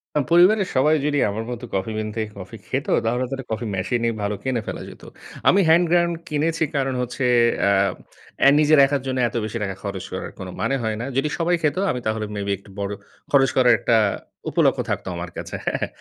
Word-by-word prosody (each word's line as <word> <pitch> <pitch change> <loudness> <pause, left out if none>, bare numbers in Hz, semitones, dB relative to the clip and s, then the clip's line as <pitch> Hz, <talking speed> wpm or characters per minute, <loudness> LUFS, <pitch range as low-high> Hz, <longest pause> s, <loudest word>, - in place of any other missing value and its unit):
আ - - +3
পরিবারের 185 +3 +5
সবাই 150 +4 +4
যদি 145 -1 +1
আমার 110 +2 -3
মতো 120 0 -6
কফি 95 +3 -1
বিনতে 110 +1 -3 0.2
কফি 95 +4 -9
খেতো, 135 +2 -2
তাহলে 120 +3 0
তো - - -5
একটা 135 -1 -8
কফি 110 +2 -2
মেশিন 100 +6 -1
ই - - 0
ভালো 100 0 -1
কিনে 130 -3 -1
ফেলা - - -5
যেতো। - - -13 0.4
আমি 195 - +6
হ্যান্ড 170 +2 +5
গ্রাইন্ড 170 -1 +3 0.2
কিনেছি, 160 +2 0
কারণ 135 -1 0
হচ্ছে 125 +2 -3 0.4
আ - - +4 0.7
অ্যা 140 - +7
নিজের 155 0 +5
একার 140 -1 -1
জন্য 130 0 -1
এতো 120 - -4
বেশি 110 +2 -4
টাকা 95 -2 -3
খরচ 100 -2 -5
করার, 95 - -5
কোন 95 - -6
মানে 135 - +1
হয় 110 -1 -1
না। 120 - -3
যদি 150 +3 +1
সবাই 175 +1 +2
খেতো, 155 +4 +1
আমি 125 - -3
তাহলে 110 0 -1
মেবি 100 0 -2
একটু 100 - -19
বড় 100 0 -2 0.4
খরচ 135 -2 +5
করার 125 -2 +6
একটা 115 - +2 0.5
উপলক্ষ্য - - +2
থাকতো - - -3
আমার 85 0 -5
কাছে। - - -6
হ্যাঁ? - - -1
125 Hz, 210 wpm, -22 LUFS, 110-150 Hz, 0.7 s, অ্যা